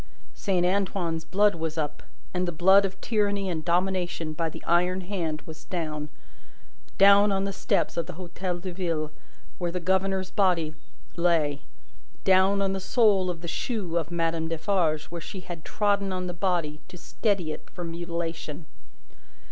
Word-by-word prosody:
Saint 185 -3 +1
Antoine's 180 -3 0
blood 205 +3 +3
was 160 -1 -4
up, 150 -2 -2 0.3
and 180 0 0
the - - 0
blood 190 +4 +6
of 190 0 -5
tyranny 205 -3 +1
and 160 -2 -3
domination 175 -2 0
by 165 +1 -1
the - - -10
iron 180 +2 +2
hand 175 -5 -3
was 160 0 -11
down 155 -4 -3 0.9
down 200 +1 +7
on 195 0 +1
the 195 0 -2
steps - - 0
of 170 - -1
the 180 - -6
Hotel 180 +1 -4
de 180 +1 -5
Ville 165 -4 -2 0.5
where 175 -2 -1
the 180 - -2
governor's 190 +1 0
body 175 -6 +2 0.4
lay 165 -5 +2 0.6
down 190 +1 +4
on 195 0 +1
the 195 - -2
sole 195 -2 +3
of 170 -2 -4
the 170 - -6
shoe 190 -2 -2
of 165 -2 0
Madame 165 -1 0
Defarge 165 -2 +1
where 170 -1 -5
she 185 +3 -7
had 175 -3 -8
trodden 200 -2 +1
on 185 0 -2
the 175 - -3
body 175 -5 -1
to 180 - -11
steady 190 -2 -1
it 155 - -8
for 180 - -7
mutilation. 170 -2 -4
180 Hz, 165 wpm, -27 LUFS, 165-195 Hz, 0.9 s, down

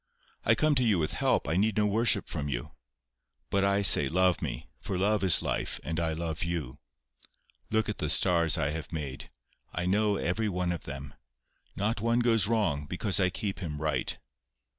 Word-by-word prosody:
I 110 - +4
come 155 +7 +2
to 130 -3 +3
you 110 -5 +3
with 75 -2 -1
help. - - +1
I 80 - 0
need 105 +2 +1
no 105 - +3
worship 110 +3 +2
from 75 -1 -4
you. - - -4 0.8
But 100 0 +2
I 100 +1 +2
say 75 -7 +7
love 90 +1 +2
me, - - -5
for 95 - -4
love 105 +2 +1
is 95 -4 +6
life, - - -2
and 80 0 -3
I 80 -1 0
love 80 -1 -3
you. 80 -5 -4 0.9
Look 110 0 +1
at 105 - -4
the 75 - -2
stars 85 -1 +3
I 75 -2 0
have 80 0 -6
made. 70 -5 -6 0.4
I 90 - -3
know 105 +2 +2
every 105 +5 -1
one 90 -2 -1
of 85 - -5
them. 70 0 -8 0.6
Not 105 +2 -1
one 115 +2 +1
goes 115 -4 +3
wrong, 100 -11 0
because 95 +4 -1
I 90 -1 +3
keep 95 +2 -4
him 75 -6 -5
right. 75 0 -2
90 Hz, 190 wpm, -28 LUFS, 80-105 Hz, 0.9 s, say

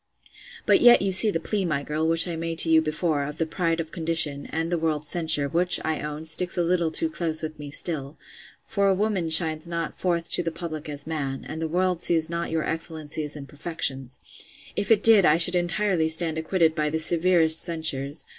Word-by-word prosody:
But - - +3
yet 240 -4 +6
you 195 - -1
see 195 +4 +4
the 165 - -2
plea, 200 +4 -2
my 150 -5 -2
girl, 155 +2 -2
which 165 +2 +2
I 170 - -4
made 165 0 -5
to 165 - -1
you 160 0 +5
before, 155 -1 -2
of 150 +2 -7
the 165 - -1
pride 165 0 -2
of 160 -1 -6
condition, 160 -4 -1
and 165 +2 -4
the 175 - 0
world's 155 -2 -1
censure, 160 -4 +2
which, 175 +4 +2
I 160 -1 -2
own, 150 +1 -7
sticks 175 +3 +2
a 175 - +1
little 170 -1 0
too 325 - -2
close 165 - -4
with 155 -1 -7
me 145 -1 -8
still: 145 -1 -4 0.5
for 200 -1 -1
a 195 - +2
woman 195 -4 -2
shines 160 0 +3
not 170 -1 -5
forth 170 -2 -2
to - - +1
the - - -3
public 155 -3 -7
as 145 -1 -4
man; 140 -4 -5
and 160 +1 -7
the 160 - -2
world 180 +1 -1
sees 165 -2 +1
not 170 0 -4
your 160 -1 -2
excellencies 155 -2 -4
and 140 -2 -9
perfections: 135 -5 -3 0.6
If 205 0 -3
it 215 -2 +3
did, 220 -3 +8
I 150 -2 +4
should 175 +1 +8
entirely 175 -1 0
stand 160 0 +2
acquitted 160 0 0
by 150 -2 -2
the 160 - -2
severest 165 0 +3
censures. 155 -3 -1
165 Hz, 215 wpm, -24 LUFS, 155-175 Hz, 0.6 s, did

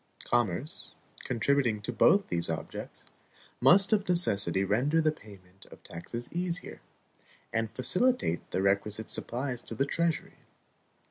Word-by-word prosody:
Commerce, 120 - -1 0.3
contributing 125 -2 0
to 120 - -4
both 200 - +4
these 85 -1 -1
objects, 80 -1 -7 0.5
must 195 +3 +6
of 205 -3 0
necessity 100 - +5
render 125 +11 +1
the 155 -1 +2
payment 95 -8 -16
of - - -16
taxes 115 +8 -8
easier, 175 0 -4 0.7
and 115 0 -1
facilitate 180 - +1
the 95 - -2
requisite 100 +2 -1
supplies 125 0 -3
to - - -8
the 135 - 0
treasury. 170 +3 -2
120 Hz, 125 wpm, -29 LUFS, 100-165 Hz, 0.7 s, must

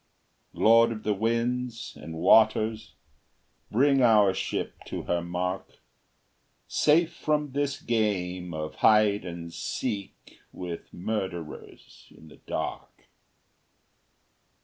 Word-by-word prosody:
Lord 115 +1 +5
of 110 -2 -6
the 105 - +1
winds 115 +2 -2
and 80 +1 -9
waters, 110 +4 +3 0.7
Bring 135 +4 +3
our 105 -5 +5
ship 95 - -3
to - - -5
her 85 0 -1
mark, 90 +2 -4 0.9
Safe 165 +3 +3
from 150 -3 -1
this 140 0 -1
game 90 -6 -1
of 80 -1 -5
hide 105 -2 +4
and 85 -1 -7
seek 100 -2 -5
With 90 -2 -7
murderers 90 -4 -6
in 80 - -15
the - - -16
dark! - - -6
105 Hz, 105 wpm, -27 LUFS, 90-115 Hz, 0.9 s, Lord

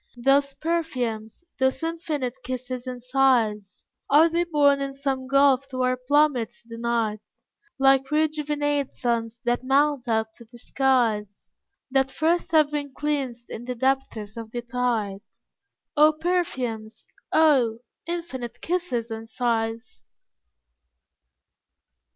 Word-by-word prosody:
Those 275 +2 +2
perfumes, 255 -8 -3 0.2
those 265 +2 +1
infinite 300 -6 -3
kisses 255 0 -5
and 250 -1 -6
sighs, 240 -6 +1 0.2
Are 310 +4 +6
they 340 +1 0
born 285 -4 +3
in 275 0 -3
some 270 -2 -2
gulf 275 0 +4
to 255 -1 -2
our 255 0 +2
plummets 255 -3 +1
denied? 230 -2 -2 0.6
Like 270 0 +4
rejuvenate 295 -2 0
suns 235 -1 -2
that 240 0 0
mount 275 0 +2
up 220 -1 0
to 235 - -13
the 240 - -12
skies, 235 -6 0 0.4
That 270 0 +2
first 330 +5 0
have 305 -2 +4
been 285 -2 -4
cleansed 270 -5 -3
in 235 - -7
the 250 0 -4
depths 235 -4 -1
of 225 -1 -7
the 240 +1 -5
tide; 230 -5 -1 0.7
Oh, 305 +1 +6
perfumes! 260 -10 -2 0.3
oh, 270 -8 +4 0.3
infinite 265 -9 -5
kisses 295 -10 -2
and 225 0 -6
sighs! 225 -1 -2
260 Hz, 120 wpm, -25 LUFS, 235-290 Hz, 0.7 s, Are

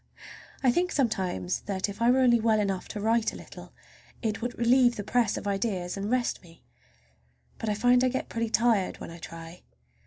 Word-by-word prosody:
I 255 - +5
think 360 +7 0
sometimes 185 - -1
that 195 -1 -1
if 200 +2 -8
I 235 - +4
were 260 +1 +4
only 240 -2 +5
well 220 -1 +2
enough 195 -3 -2
to 210 - -6
write 225 +2 +1
a - - -8
little - - -11 0.5
it 215 -1 -2
would 245 +1 -4
relieve 240 0 +4
the 205 - -5
press 225 0 +1
of - - -6
ideas 195 -3 -2
and 200 +1 -4
rest 250 0 0
me. 165 -2 -19 1.0
But 225 - -3
I 210 - 0
find 245 +3 +4
I - - +4
get 260 +1 -3
pretty 230 -1 -2
tired 220 -4 +2
when - - -8
I 170 - -10
try. 165 +1 -10
220 Hz, 205 wpm, -27 LUFS, 195-240 Hz, 1.0 s, I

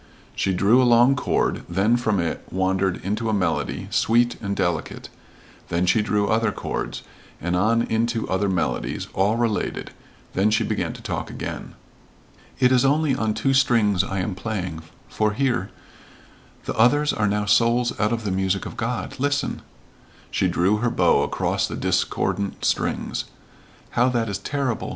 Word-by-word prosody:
She 95 - 0
drew 100 +7 +4
a - - +3
long 120 +2 +5
chord, 125 - 0
then 100 +7 +2
from 110 -5 0
it 85 -1 -2
wandered 95 0 0
into 110 +3 -1
a 110 - +1
melody, 90 -5 -1
sweet 120 +1 +2
and 100 -1 -2
delicate; 85 -4 -2 0.6
then 85 +2 +1
she 105 +4 +3
drew 105 -1 0
other 115 +2 +2
chords, - - -4 0.4
and 90 +2 -1
on 115 +5 +2
into 115 0 -1
other 95 +2 0
melodies, 90 -2 -2
all 100 +4 +2
related; 115 -3 -1 0.4
then 100 +3 +2
she 110 - +2
began - - -2
to - - -12
talk - - -4
again. - - -6 0.8
"It 125 -1 +4
is 125 -1 +4
only 145 +1 +2
on 110 -4 -1
two 135 - +1
strings 115 -8 +3
I 95 - -4
am 95 +2 -2
playing 90 -5 -4 0.3
for 105 -1 0
hear? 120 -6 0 1.0
the - - -2
others 145 +6 +3
are 105 -1 0
now 105 +1 0
souls 115 +4 +3
out 105 +1 +2
of 115 -1 -2
the 100 - -2
music 95 +1 0
of - - -7
God 115 -2 -3
listen 145 0 -1 0.3
" - - -28
she 95 - +1
drew 90 +4 +2
her 120 +3 0
bow - - +3
across - - 0
the - - -5
discordant 100 -1 -1
strings. - - -1 0.7
"How 125 +2 +3
that 115 -3 0
is 100 -1 -3
terrible! 135 +1 -2
110 Hz, 165 wpm, -23 LUFS, 95-120 Hz, 1.0 s, long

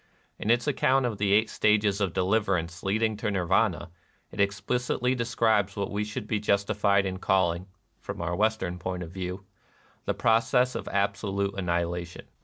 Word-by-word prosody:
In 105 - -3
its 120 +1 +3
account 135 -2 +2
of 115 -4 -3
the 100 -1 +1
Eight 110 +2 +4
Stages 105 -2 +2
of 95 -3 +1
Deliverance 95 -3 0
leading 110 +3 0
to 105 0 -2
Nirvana, 90 -3 +1 0.4
it - - -10
explicitly 120 +5 0
describes 110 -5 +1
what 100 -1 -3
we 105 +1 -1
should 105 +2 -5
be 105 0 -1
justified 100 -1 +2
in 95 -1 -3
call 95 -3 +2
ing, 85 +3 -7 0.3
from - - -7
our 85 0 -2
Western 105 -3 0
point 90 0 -4
of 85 - -9
view, 90 +1 -5 0.6
the - - -1
pro 115 0 +4
cess 125 +2 +1
of - - -5
absolute 100 0 -1
annihilation. 85 -2 -2
100 Hz, 170 wpm, -27 LUFS, 95-110 Hz, 0.6 s, Eight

